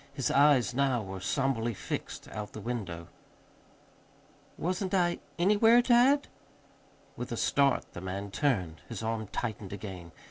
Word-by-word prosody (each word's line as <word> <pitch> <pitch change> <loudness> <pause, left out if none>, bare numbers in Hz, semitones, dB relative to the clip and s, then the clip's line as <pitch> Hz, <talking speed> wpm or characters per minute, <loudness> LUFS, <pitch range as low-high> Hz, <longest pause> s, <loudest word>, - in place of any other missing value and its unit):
His 135 - 0
eyes 140 -6 +4
now 130 -3 +1
were 95 -1 -6
somberly 120 +1 0
fixed - - -5
out 105 -1 -6
the - - -7
window. 95 -8 -5 1.5
"Wasn't 185 +2 -1
I 175 -2 +2 0.2
anywhere, 210 +6 +5
dad?" 255 +4 +4 0.9
With - - -6
a - - -2
start 140 -2 +2
the 90 - -7
man 95 +2 -5
turned. 95 - 0
His 115 -2 -5
arm 110 -1 -2
tightened 105 -3 -4
again. 95 -4 -8
120 Hz, 135 wpm, -30 LUFS, 100-155 Hz, 1.5 s, anywhere